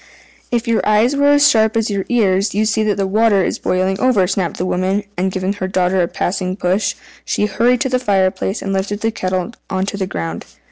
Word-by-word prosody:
"If 240 0 -1
your 230 -1 +2
eyes 215 +6 +3
were 285 0 +2
as 290 0 +5
sharp 220 0 +3
as 225 -1 0
your 195 -1 -2
ears 200 -4 +1
you'd 215 +1 +2
see 220 0 +1
that 210 -1 0
the 195 - 0
water 205 0 +3
is - - -2
boiling 185 +1 0
over," 245 -8 +3
snapped 185 -2 -2
the 180 - -2
woman; 185 +3 0
and 185 +2 -1
giving 190 +1 -2
her 190 -2 -4
daughter 185 0 +1
a 170 - +1
passing 185 +1 -2
push, 185 +1 0 0.3
she 210 - 0
hurried 235 +4 +1
to 265 - 0
the 255 0 +1
fire 195 -6 +2
place, 195 +2 -4
and 195 - -2
lifted 205 +2 -2
the 225 - 0
kettle 185 +1 -3 0.2
on 190 -1 -1
to 200 - -4
the 190 -2 -2
ground. 85 - -5
195 Hz, 230 wpm, -17 LUFS, 185-220 Hz, 0.3 s, as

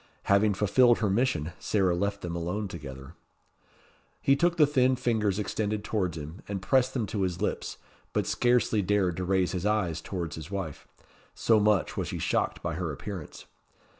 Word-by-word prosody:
Having 100 +1 +3
fulfilled 120 +5 +4
her 105 -4 0
mission, 95 - +1
Sarah 95 -4 +1
left 100 +2 -1
them 85 -1 -4
alone 90 +5 -2
together. 70 -7 -9 1.1
He 135 - +4
took 170 +4 +2
the 155 - +7
thin 130 -3 +3
fingers 110 -6 0
extended 105 0 -2
towards 95 -7 -1
him, 80 +5 -8
and 100 -1 -3
pressed 130 +6 +2
them 120 -4 0
to 100 0 -3
his 90 -2 -1
lips, - - -2 0.3
but - - 0
scarcely 120 -3 +2
dared 95 -2 +1
to 90 - -2
raise 95 -1 +1
his 90 -2 -3
eyes 105 -6 0
towards 85 -6 -4
his 80 +1 -8
wife, 95 -7 -5 0.5
so 110 -2 +3
much 105 -3 +2
was - - -2
he - - -4
shocked - - -1
by - - -2
her 85 0 -3
appearance. 90 +2 -7
100 Hz, 175 wpm, -28 LUFS, 90-110 Hz, 1.1 s, the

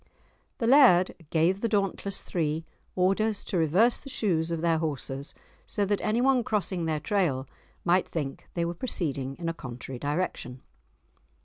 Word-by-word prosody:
The 235 - -1
Laird 235 -9 +6 0.2
gave 175 +5 +2
the 230 - 0
dauntless 200 -1 -1
three 160 -1 -2 0.3
orders 195 +3 +1
to 185 - -2
reverse 185 +10 +3
the 275 - -10
shoes 170 -10 0
of 165 -1 -2
their 165 -1 +2
horses, 140 -3 -4 0.3
so 205 - 0
that 205 0 0
anyone 245 +4 +2
crossing 195 -5 -1
their 155 -1 0
trail 150 - 0 0.4
might 180 +1 +3
think 145 -5 -4
they 170 -1 0
were 170 - -2
proceeding 140 - -2
in 170 +2 -5
a 165 - 0
contrary 125 -3 -7
direction. 145 -4 -3
175 Hz, 150 wpm, -28 LUFS, 155-205 Hz, 0.4 s, Laird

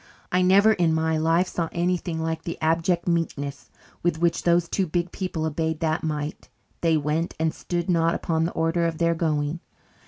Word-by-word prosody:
I 180 - +3
never, 200 +4 +6
in 175 -5 +2
all 160 - 0
my 160 0 +1
life, 165 +3 +2
saw 165 -3 -2
anything 170 -2 -1
like 160 0 -2
the 170 - -6
abject 165 +3 +1
meekness 150 -5 -2 0.3
with 175 -2 +1
which 170 +1 +1
those 170 0 +3
two 190 +2 0
big 175 +2 -1
people 180 -5 -3
obeyed 160 0 -1
that 160 -1 0
mite. 150 -1 -4 0.3
They 165 -2 +3
went, 155 +3 -1
and 160 0 +1
stood 175 -1 -3
not 165 -2 +2
upon 160 -1 0
the 170 - -2
order 165 +1 +1
of 165 -1 -3
their 170 0 +2
going. 155 -1 -1
165 Hz, 190 wpm, -25 LUFS, 160-175 Hz, 0.3 s, never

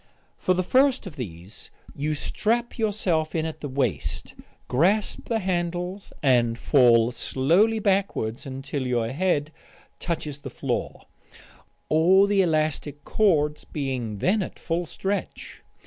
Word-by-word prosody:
For 185 - +2
the 185 - +1
first 260 +5 +3
of 180 -6 -8
these 95 - -7 0.3
you 150 +2 -1
strap 235 - -1
yourself 185 -8 0
in 160 -1 0
at 160 - -6
the 145 - -4
waist, 125 - -2 0.3
grasp 190 +11 +1
the 230 - +2
handles, 180 0 -2
and 120 -4 +3
fall 120 -4 +4
slowly 170 - +2
backwards 190 - 0
until 135 0 -4
your 120 -2 0
head 155 -1 0 0.5
touches 150 -4 -3
the 140 -1 -7
floor - - -3 0.8
all 180 +5 +5
the 200 -1 +3
elastic 155 -3 -1
cords 150 -8 +2
being 130 -7 -3
then 195 - +2
at 185 - -5
full 170 0 -2
stretch. 195 +5 -4
155 Hz, 130 wpm, -25 LUFS, 135-190 Hz, 0.8 s, all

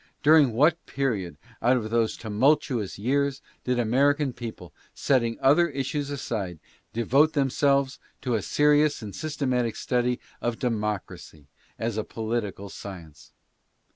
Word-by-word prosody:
During 150 -5 +6
what 155 +8 +3
period, 105 - -2 0.2
out 125 +2 +4
of 110 -2 -4
those 115 -1 +1
tumultuous 120 -1 +1
years, 140 +5 0 0.2
did 125 -1 0
the 120 - +2
American 140 +4 +2
people, 110 -8 -8 0.2
setting 120 -4 +1
other 160 +6 +4
issues 140 +1 -3
aside, 105 - -4 0.3
devote 135 +7 +3
themselves 140 -1 +1 0.2
to 125 - -1
a 110 - +1
serious 150 +3 +2
and 100 -3 -7
systematic 130 -6 -1
study 125 0 0 0.2
of 120 -1 -1
democracy 105 - -4 0.3
as 115 -1 -2
a - - -1
political 110 -3 -4
science? 85 -7 -10
125 Hz, 130 wpm, -26 LUFS, 110-140 Hz, 0.3 s, During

